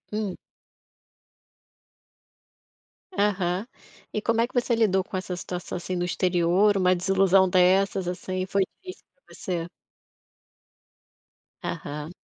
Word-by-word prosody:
Hum. 210 Hz, -4 st, -2 dB, 2.8 s
Aham. 195 Hz, -, 0 dB, 0.5 s
E 215 Hz, -, -1 dB
como 230 Hz, +1 st, +1 dB
é 235 Hz, -, +2 dB
que -, -, -23 dB
você 245 Hz, -1 st, +1 dB
lidou 195 Hz, -4 st, +2 dB
com 190 Hz, -, -8 dB
essa 185 Hz, -1 st, -4 dB
situação, 180 Hz, 0 st, -6 dB
assim, 180 Hz, +1 st, -3 dB
do 175 Hz, -, 0 dB
exterior, 180 Hz, +3 st, +2 dB
uma 185 Hz, -1 st, +3 dB
desilusão 190 Hz, +1 st, +4 dB
dessas, 185 Hz, +1 st, +3 dB
assim. 185 Hz, +1 st, -3 dB
Foi 195 Hz, +1 st, +1 dB, 0.2 s
difícil 370 Hz, -1 st, -10 dB
pra -, -, -19 dB
você? 175 Hz, -4 st, -3 dB, 1.9 s
Aham. 150 Hz, +3 st, -5 dB
185 Hz, 110 wpm, -26 LUFS, 180-205 Hz, 2.8 s, desilusão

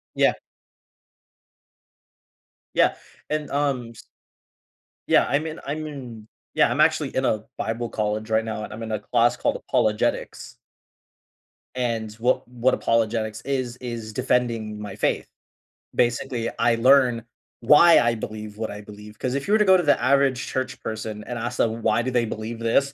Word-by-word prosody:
Yeah. -, -, +4 dB, 2.4 s
Yeah, -, -, +3 dB, 0.3 s
and, 150 Hz, -1 st, -2 dB
um, 140 Hz, -5 st, -1 dB
s 115 Hz, -, -15 dB, 1.0 s
Yeah, -, -, +5 dB
I’m 145 Hz, +4 st, 0 dB
in 160 Hz, 0 st, -6 dB
I’m 155 Hz, +2 st, -3 dB
in 125 Hz, -7 st, -9 dB, 0.3 s
Yeah, -, -, +4 dB
I'm -, -, +1 dB
actually -, -, +2 dB
in -, -, +1 dB
a 110 Hz, -1 st, 0 dB
bible 115 Hz, +2 st, -3 dB
college 105 Hz, 0 st, -2 dB
right 110 Hz, 0 st, +2 dB
now, 110 Hz, -1 st, -4 dB
and -, -, -7 dB
I'm 110 Hz, -, -8 dB
in 110 Hz, -, -5 dB
a 110 Hz, -, -1 dB
class -, -, +2 dB
called -, -, 0 dB
Apologetics. 105 Hz, -1 st, -1 dB, 1.2 s
And 115 Hz, -4 st, -2 dB
what 120 Hz, +3 st, 0 dB
what 125 Hz, +1 st, +1 dB
Apologetics 110 Hz, -1 st, 0 dB
is, 130 Hz, -3 st, -3 dB
is 115 Hz, -3 st, -6 dB
defending 115 Hz, -4 st, -1 dB
my 100 Hz, -2 st, -7 dB
faith. 105 Hz, -, 0 dB, 0.7 s
Basically, 120 Hz, 0 st, 0 dB
I 120 Hz, -, +3 dB
learn 125 Hz, -1 st, +4 dB, 0.4 s
why 150 Hz, +7 st, +7 dB
I 120 Hz, 0 st, +2 dB
believe 110 Hz, -1 st, -7 dB
what 110 Hz, 0 st, -3 dB
I 105 Hz, 0 st, -7 dB
believe, 105 Hz, +1 st, -12 dB
‘cause 125 Hz, +2 st, -2 dB
if 140 Hz, +4 st, -3 dB
you -, -, -1 dB
were -, -, +6 dB
to 210 Hz, -, +3 dB
go 190 Hz, -1 st, +7 dB
to -, -, +1 dB
the 145 Hz, -5 st, +3 dB
average 135 Hz, 0 st, +2 dB
church 130 Hz, 0 st, -3 dB
person 110 Hz, -1 st, -5 dB
and 120 Hz, -1 st, -5 dB
ask 120 Hz, +2 st, -4 dB
them 115 Hz, 0 st, 0 dB
why 110 Hz, +1 st, +2 dB
do 130 Hz, -, -2 dB
they 120 Hz, -1 st, +2 dB
believe 110 Hz, +1 st, -5 dB
this? 135 Hz, +5 st, +1 dB
115 Hz, 165 wpm, -24 LUFS, 110-130 Hz, 2.4 s, why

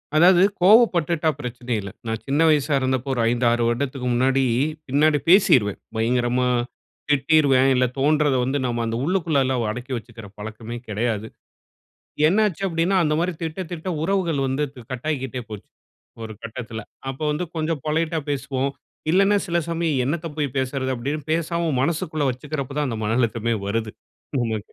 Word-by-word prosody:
அதாவது 175 Hz, +3 st, +6 dB, 0.2 s
கோவப்பட்டுட்டா 175 Hz, -6 st, +4 dB
பிரச்சனை 125 Hz, -1 st, -6 dB
இல்ல. 100 Hz, -, -7 dB, 0.2 s
நான் 110 Hz, 0 st, -2 dB
சின்ன 140 Hz, +3 st, +1 dB
வயசா 150 Hz, -1 st, +2 dB
இருந்தப்ப 130 Hz, 0 st, -1 dB
ஒரு 120 Hz, -, 0 dB
5, 120 Hz, 0 st, 0 dB
6 120 Hz, 0 st, +1 dB
வருடத்துக்கு 125 Hz, +1 st, -2 dB
முன்னாடி 130 Hz, +2 st, +2 dB, 0.4 s
பின்னாடி 150 Hz, +3 st, +3 dB
பேசிருவேன். 125 Hz, -, +5 dB, 0.2 s
பயங்கரமா 120 Hz, +2 st, +1 dB, 0.6 s
திட்டிருவேன். 140 Hz, -2 st, +4 dB
இல்ல 125 Hz, 0 st, +3 dB
தோன்றத 145 Hz, 0 st, +3 dB
வந்து 135 Hz, +3 st, 0 dB
நம்ம 120 Hz, -1 st, -1 dB
அந்த 115 Hz, 0 st, -2 dB
உள்ளுக்குள்ளலாம் 140 Hz, -, +1 dB
அடக்கி 125 Hz, +4 st, -7 dB
வச்சிக்கிற 115 Hz, -2 st, -10 dB
பழக்கமே 110 Hz, +2 st, -7 dB
கிடையாது. 110 Hz, 0 st, -2 dB, 1.0 s
என்ன 210 Hz, +6 st, +3 dB
ஆச்சு 195 Hz, +1 st, -8 dB
அப்படின்னா 170 Hz, +3 st, +1 dB
அந்தமாரி 165 Hz, +4 st, +1 dB
திட்ட, 160 Hz, +3 st, -4 dB
திட்ட 175 Hz, +2 st, -5 dB
உறவுகள் 170 Hz, -5 st, 0 dB
வந்து 135 Hz, +3 st, -1 dB
து 125 Hz, -, -11 dB
கட்டாகிக்ட்டே 130 Hz, -1 st, -3 dB
போச்சு. 105 Hz, -2 st, -9 dB, 0.5 s
ஒரு 110 Hz, -1 st, -6 dB
கட்டத்தில. 115 Hz, -1 st, -6 dB, 0.3 s
அப்போ 135 Hz, +3 st, -5 dB
வந்து 155 Hz, +4 st, -2 dB
கொஞ்சம் 155 Hz, -2 st, -1 dB
பொலைட்‌டா 160 Hz, +1 st, 0 dB
பேசுவோம். 135 Hz, 0 st, -1 dB, 0.4 s
இல்லன்னா, 195 Hz, +4 st, +4 dB
சில 170 Hz, 0 st, 0 dB
சமயம் 165 Hz, -4 st, 0 dB
என்னத்த 160 Hz, +4 st, -2 dB
போய் 145 Hz, -2 st, 0 dB
பேசுறது 130 Hz, 0 st, -1 dB
அப்பிடின்னு, 140 Hz, +5 st, -4 dB
பேசாம 170 Hz, 0 st, 0 dB
மனசுக்குள்ள 155 Hz, -1 st, -1 dB
வச்சுக்கிறப்ப 140 Hz, +2 st, -5 dB
தான் 150 Hz, -, +1 dB
அந்த 115 Hz, -, -3 dB
மன 110 Hz, +2 st, 0 dB
அழுத்தமே 115 Hz, -1 st, 0 dB
வருது. 110 Hz, +1 st, -1 dB, 0.5 s
நமக்கு 115 Hz, -3 st, 0 dB
135 Hz, 150 wpm, -23 LUFS, 120-160 Hz, 1.0 s, அதாவது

